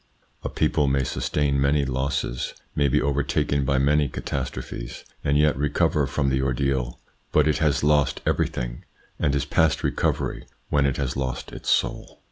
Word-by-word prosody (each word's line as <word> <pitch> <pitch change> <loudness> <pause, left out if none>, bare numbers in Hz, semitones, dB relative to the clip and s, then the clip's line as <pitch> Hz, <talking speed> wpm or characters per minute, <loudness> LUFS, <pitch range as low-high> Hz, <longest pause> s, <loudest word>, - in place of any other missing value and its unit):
A - - -2
people 75 - +1
may 70 0 +2
sustain 70 +2 0
many 70 +1 +3
losses, 65 -1 -2 0.2
may 70 -1 +3
be 65 - +3
overtaken 70 0 0
by 70 0 +2
many 70 +1 +3
catastrophes, 65 -2 -5 0.2
and 70 +1 +2
yet 75 0 +4
recover 75 +1 +1
from 70 +1 0
the 65 0 +1
ordeal, 65 -2 -1 0.3
but 75 0 +4
it 75 0 +2
has 75 -3 +2
lost 75 -2 +3
everything, - - -1 0.4
and 70 -1 +1
is 70 0 0
past 80 +1 +2
recovery, - - -1 0.2
when 70 -1 +3
it 70 - -1
has 65 -3 -2
lost 65 -2 -3
its - - -6
soul. - - 0
70 Hz, 160 wpm, -24 LUFS, 65-75 Hz, 0.4 s, yet